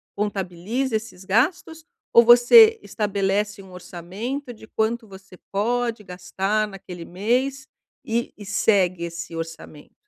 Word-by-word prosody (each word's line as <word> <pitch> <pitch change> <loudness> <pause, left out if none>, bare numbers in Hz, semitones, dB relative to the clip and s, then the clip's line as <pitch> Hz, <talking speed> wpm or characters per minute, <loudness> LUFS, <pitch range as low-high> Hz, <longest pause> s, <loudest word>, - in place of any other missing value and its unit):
contabiliza 205 +5 -2
esses 215 -4 -6
gastos? 320 - 0 0.3
Ou 235 - +8
você 430 - +7
estabelece 205 0 -2
um 190 -1 -15
orçamento 210 - -6
de 220 - -14
quanto 225 +2 -1
você 190 -1 -14 0.2
pode 230 +2 -1
gastar 190 +4 -2
naquele 180 -3 -10
mês 255 +9 -1 0.4
e 235 +1 -2
e 205 - -10
segue 190 -3 +1
esse 170 0 -6
orçamento? 165 -2 -9
210 Hz, 120 wpm, -23 LUFS, 185-240 Hz, 0.4 s, Ou